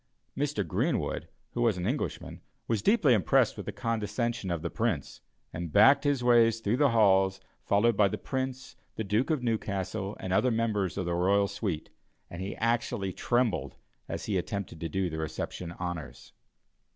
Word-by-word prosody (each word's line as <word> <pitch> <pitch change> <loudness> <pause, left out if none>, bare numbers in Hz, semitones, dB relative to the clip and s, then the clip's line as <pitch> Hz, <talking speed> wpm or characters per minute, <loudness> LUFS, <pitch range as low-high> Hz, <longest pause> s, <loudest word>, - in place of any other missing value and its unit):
Mr. 135 - -1
Greenwood, - - -1 0.2
who 120 - -3
was 115 -5 +3
an 90 - -3
Englishman, 130 +8 -3 0.3
was 110 -3 0
deeply 165 - +4
impressed 100 -7 +3
with - - -8
the - - -2
condescension 115 -1 -2
of 85 -2 -2
the 85 - -2
Prince, 110 - -2 0.3
and 85 -1 -5
backed 130 - +6
his 140 -3 +1
way 120 -2 +6
through 115 0 -1
the 145 0 +4
halls, 95 -4 +4 0.3
followed 110 +3 +3
by 100 0 +5
the - - -3
Prince, 130 -1 -4 0.2
the 110 - -2
Duke 105 - 0
of 155 -6 0
Newcastle, 100 -3 -2
and 95 - -3
other 110 +6 +3
members 110 -6 0
of 95 - -1
the 85 - -1
royal 100 +3 +3
suite, 100 -5 -4 0.4
and 85 - -6
he 95 +1 -4
actually 115 -4 -1
trembled 120 -4 0 0.3
as - - -4
he - - 0
attempted 100 -5 -5
to 80 - -4
do 95 +3 0
the 80 -2 -4
reception 80 +2 -4
honors. 85 -8 -6
105 Hz, 175 wpm, -29 LUFS, 95-120 Hz, 0.4 s, backed